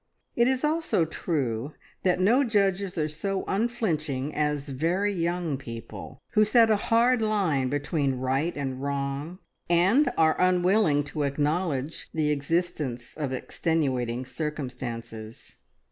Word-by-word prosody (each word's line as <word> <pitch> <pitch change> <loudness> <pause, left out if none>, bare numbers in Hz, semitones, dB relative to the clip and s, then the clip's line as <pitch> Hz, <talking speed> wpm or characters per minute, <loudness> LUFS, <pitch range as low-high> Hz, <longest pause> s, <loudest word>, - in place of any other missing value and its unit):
It 235 0 +4
is 260 +1 +1
also 310 - +1
true 140 -5 -2 0.3
that 180 -1 +2
no 230 +9 +4
judges 200 -5 +1
are 155 -1 +1
so 190 +6 -2
unflinching 165 - -1
as 150 -1 -1
very 175 +9 0
young 170 -4 -1
people, 115 +1 -8
who 215 - +4
set 225 +1 +5
a - - +5
hard 230 +3 +3
line 185 -12 +1
between 145 -1 0
right 135 +6 -1
and 135 -2 -3
wrong, 140 +4 -3 0.3
and 200 - +4
are 160 +1 +3
unwilling 180 -4 +3
to 145 +1 -4
acknowledge 145 +1 -1
the 150 -2 +1
existence 145 -5 -2
of 145 -4 -3
extenuating 130 -4 -1
circumstances. 125 -7 -6
155 Hz, 125 wpm, -27 LUFS, 140-195 Hz, 0.3 s, set